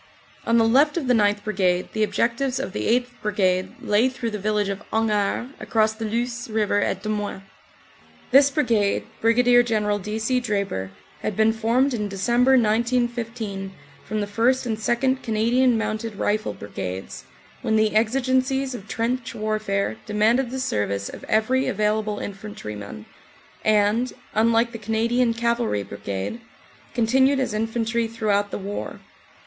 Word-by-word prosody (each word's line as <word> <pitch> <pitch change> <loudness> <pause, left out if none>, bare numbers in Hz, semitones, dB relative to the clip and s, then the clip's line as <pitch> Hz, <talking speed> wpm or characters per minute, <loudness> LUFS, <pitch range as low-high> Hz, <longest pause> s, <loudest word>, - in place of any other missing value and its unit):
On 230 - +4
the 225 -1 +4
left 285 +7 +4
of 320 - -1
the 250 - +3
9th. 205 -2 +2
Brigade 185 -4 0
the 220 - -2
objectives 240 +5 0
of 265 - -4
the - - -2
8th. 250 0 -14
Brigade 185 -3 0
lay 215 +5 +2
through 240 -3 -4
the 210 - -4
village 210 0 0
of 200 +1 -4
Hangard 220 +2 0
across 220 -1 +1
the 220 +1 -5
Luce 235 +2 -2
river 210 -2 +1
at - - -1
Demuin. 210 -2 -3 0.9
This 275 +2 +7
brigade, 230 -9 +1 0.2
Brig. 230 +2 +3 0.2
General 210 -3 0
D. 210 +3 -4
C. 250 +3 +1
Draper, 200 - -2 0.3
had 215 - -3
been 220 0 +4
formed 235 +5 +1
in 210 -3 -2
Dec., 195 -1 -4
1915, 235 -4 +1 0.3
from 215 +1 -3
the - - -1
1st. 235 +6 +1
and 225 -3 -1
2nd. 260 +4 0
Cana 220 0 0
dian 250 -1 +4
Mounted 220 0 -3
Rifle 210 +2 -1
Brigades, 95 -2 -6 0.4
when 220 - 0
the 215 -1 +2
exigencies 260 +3 +1
of 215 -4 -8
trench 235 +2 -2
warfare 215 - -1
demanded 220 +4 +2
the 265 +2 -4
service 100 - -1
of - - -10
every 250 +5 +1
available 210 +1 0
infantryman, 105 - -7 0.6
and, 215 +3 +2 0.2
unlike 230 +2 +3
the 230 - -7
Canadian 230 +2 +1
Cavalry 235 - 0
Brigade, 100 - -5 0.5
continued 265 +4 +3
as 255 -5 -1
infantry 225 +1 -1
throughout 210 -3 0
the - - -4
war. 200 +1 -5
220 Hz, 150 wpm, -23 LUFS, 205-240 Hz, 0.9 s, This